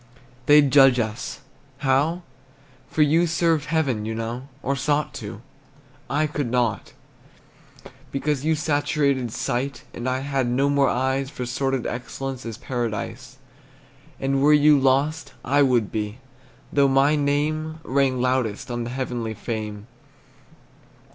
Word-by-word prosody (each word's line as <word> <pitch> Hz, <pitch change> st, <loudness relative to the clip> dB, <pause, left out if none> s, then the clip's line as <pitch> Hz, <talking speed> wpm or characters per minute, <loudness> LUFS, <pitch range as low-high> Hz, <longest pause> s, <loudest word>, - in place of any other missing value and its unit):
They'd 145 Hz, -2 st, +6 dB
judge 135 Hz, -2 st, +7 dB
us 110 Hz, +3 st, -4 dB, 0.4 s
how? 145 Hz, +6 st, +1 dB, 0.7 s
For 155 Hz, -, +3 dB
you 165 Hz, +4 st, +3 dB
served 165 Hz, -2 st, +1 dB
Heaven, 145 Hz, -8 st, 0 dB
you 110 Hz, +1 st, -3 dB
know, 115 Hz, +4 st, -4 dB, 0.2 s
Or 140 Hz, +2 st, 0 dB
sought 145 Hz, +3 st, 0 dB
to; 105 Hz, 0 st, -7 dB, 0.7 s
I 150 Hz, +2 st, +1 dB
could 145 Hz, -4 st, -2 dB
not, 120 Hz, -2 st, -1 dB, 1.2 s
Because 140 Hz, 0 st, -1 dB
you 160 Hz, +1 st, +2 dB
saturated 145 Hz, -4 st, 0 dB
sight, 125 Hz, +3 st, -3 dB
And 120 Hz, +2 st, -3 dB
I 130 Hz, +1 st, -1 dB
had 135 Hz, -2 st, -1 dB
no 135 Hz, +4 st, +1 dB
more 140 Hz, -1 st, +3 dB
eyes 130 Hz, +1 st, 0 dB
For 125 Hz, -, -5 dB
sordid 135 Hz, +1 st, -1 dB
excellence 130 Hz, +1 st, -5 dB
As 115 Hz, -1 st, -6 dB
Paradise. 115 Hz, -6 st, -4 dB, 0.8 s
And 135 Hz, 0 st, 0 dB
were 150 Hz, +2 st, +6 dB
you 150 Hz, -1 st, +6 dB
lost, 140 Hz, +4 st, +1 dB
I 140 Hz, +4 st, +3 dB
would 125 Hz, -6 st, +2 dB
be, 105 Hz, 0 st, -3 dB, 0.6 s
Though 140 Hz, -1 st, +4 dB
my 135 Hz, +3 st, +4 dB
name 155 Hz, +2 st, -1 dB
Rang 135 Hz, -1 st, +1 dB
loudest 125 Hz, -3 st, -1 dB
On 120 Hz, 0 st, -2 dB
the -, -, -5 dB
heavenly 120 Hz, -3 st, -3 dB
fame. 105 Hz, -3 st, -5 dB
135 Hz, 135 wpm, -23 LUFS, 120-145 Hz, 1.2 s, judge